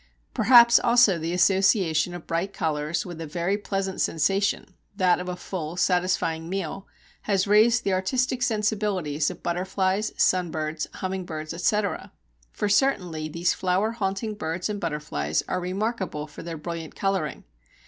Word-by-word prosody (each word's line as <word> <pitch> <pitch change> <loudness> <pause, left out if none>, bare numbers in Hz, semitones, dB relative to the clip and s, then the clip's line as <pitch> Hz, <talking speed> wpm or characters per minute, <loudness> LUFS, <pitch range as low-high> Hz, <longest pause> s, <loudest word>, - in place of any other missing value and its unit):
Perhaps 235 -1 +7
also 235 -7 +4
the 165 +1 -3
association 180 -2 +2
of 175 - -9
bright 170 +4 -2
colours 155 0 -2
with 175 -3 -7
a 160 - -5
very 175 +5 -1
pleasant 195 -2 -3
sensation 195 +4 0 0.2
that 180 -2 +3
of 180 0 -5
a 180 - -3
full, 175 -2 -6
satisfying 180 -3 0
meal 195 0 -4 0.4
has 195 -2 +2
raised 220 +4 +4
the 195 - 0
artistic 245 +7 0
sensibilities 210 - 0
of - - -10
butterflies, 190 +3 -1
sunbirds, 160 -4 0
humming 185 0 -3
birds, 155 -2 -6
etc. 200 +4 -1 0.4
For - - -2
certainly 180 - +1
these 170 +3 0
flower 190 +4 0
haunting 215 0 -2
birds 170 0 -3
and 205 -1 -4
butterflies 150 - -2
are 185 - -1
remarkable 190 -3 -3
for 150 - -11
their 165 -1 -6
brilliant 165 0 -6
colouring. 195 -7 -2
185 Hz, 145 wpm, -25 LUFS, 165-200 Hz, 0.4 s, Perhaps